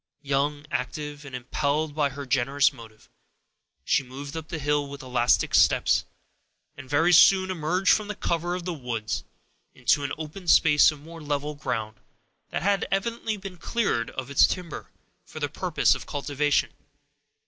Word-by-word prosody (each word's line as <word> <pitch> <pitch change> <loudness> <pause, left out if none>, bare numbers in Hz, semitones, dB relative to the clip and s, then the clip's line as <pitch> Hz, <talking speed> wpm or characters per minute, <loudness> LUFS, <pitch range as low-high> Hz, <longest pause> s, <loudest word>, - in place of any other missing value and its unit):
Young, 145 +1 -1
active, 145 +3 -4
and 135 -2 -8
impelled 145 +4 -1
by 145 -1 +1
her 140 +1 -7
generous 135 +2 +2
motive, 110 -2 -15 0.8
she - - +3
moved 140 +3 -9
up 160 -1 -6
the 170 -1 -5
hill 145 -1 0
with 140 0 -9
elastic 125 -1 +1
steps, - - +4 0.7
and 130 - -11
very 165 +5 +3
soon 190 +2 +6
emerged 180 +3 +2
from 215 -1 0
the 210 - -4
cover 175 -2 -1
of 180 -1 -6
the 180 - -2
woods, 120 -7 -4 0.5
into 145 - +2
an 140 - -3
open 160 +4 -8
space 150 -2 +6
of 150 - -11
more 165 +2 -11
level 145 0 -2
ground, 110 -7 -4 0.5
that - - -3
had 200 0 +1
evidently 220 +2 -2
been 195 -2 -9
cleared 200 - -1
of 130 +1 -6
its 140 - +6
timber, 175 -4 -5 0.4
for - - -10
the - - -1
purpose - - +1
of - - -7
cultivation. 145 0 0
145 Hz, 160 wpm, -26 LUFS, 135-170 Hz, 0.8 s, soon